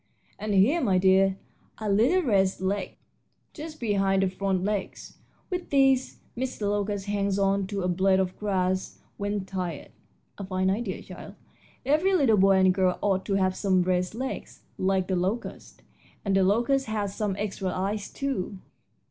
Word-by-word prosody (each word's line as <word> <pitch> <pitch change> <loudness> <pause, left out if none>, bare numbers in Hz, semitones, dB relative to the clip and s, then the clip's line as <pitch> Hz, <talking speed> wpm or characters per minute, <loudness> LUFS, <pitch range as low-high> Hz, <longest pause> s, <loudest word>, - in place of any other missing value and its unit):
And 210 -1 -1
here, 255 - +4
my 195 -7 +2
dear, 190 +1 +4 0.4
are 215 - -5
little 240 - +3
rest 195 -7 +2
legs 195 +2 -2 0.6
just 310 0 -8
behind 195 -4 +1
the 190 - +1
front 190 -1 -1
legs. 205 -1 -4 0.3
With 360 -1 -3
these 270 -2 +3 0.2
Mr. 255 -1 -4
Locust 205 -1 -1
hangs 200 -1 0
on 195 -1 +1
to 200 -2 -3
a - - 0
blade 190 +1 +2
of 185 -1 -1
grass 190 -2 -1 0.2
when 205 -1 -2
tired 180 -5 -5 0.5
a - - -4
fine 185 0 0
idea, 205 -1 -3
child; - - -10 0.5
every 315 +8 +3
little 265 - +4
boy 195 0 +5
and 190 -1 +4
girl 185 -1 +1
ought 190 -2 +1
to 200 - +1
have 185 -1 +1
some 185 -3 +2
rest 180 +2 0
legs 260 +3 -6 0.2
like 190 -1 +1
the 190 - 0
locust. 190 +7 -4 0.4
And 195 -1 +1
the 195 - +4
locust 240 +7 +2
has 205 -2 -2
some 210 -3 -1
extra 200 -2 -3
eyes, 195 +3 -2
too." 255 -8 -3
195 Hz, 165 wpm, -26 LUFS, 190-215 Hz, 0.6 s, boy